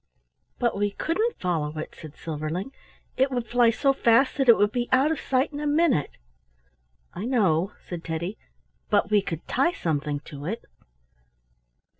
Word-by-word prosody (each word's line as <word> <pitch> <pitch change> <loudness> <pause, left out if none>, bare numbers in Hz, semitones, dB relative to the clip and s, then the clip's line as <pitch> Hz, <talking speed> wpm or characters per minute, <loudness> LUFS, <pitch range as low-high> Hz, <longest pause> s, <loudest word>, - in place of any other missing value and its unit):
"But 240 -1 0
we 205 +1 +1
couldn't 395 - -1
follow 155 -4 -1
it," 155 - -5
said 155 -2 -11
Silverling. 160 - -4 0.5
"It 265 +1 +3
would 245 -3 -2
fly 240 +1 +4
so 275 +4 +2
fast 260 +1 +3
that 270 -3 +2
it 235 - +9
would 205 0 +3
be 240 +1 -2
out 270 +4 +4
of 320 - -1
sight 265 +3 0
in 290 - -4
a 300 - -2
minute." 290 - +2 1.0
"I 195 - -5
know," 195 -7 +2
said 175 -2 -6
Teddy, 170 +5 -4 0.5
"but 210 -1 +2
we 210 -1 +5
could 165 -4 -6
tie 275 +7 +2
something 150 - -2
to 145 -1 -9
it." 220 +5 -4
215 Hz, 165 wpm, -26 LUFS, 165-265 Hz, 1.0 s, it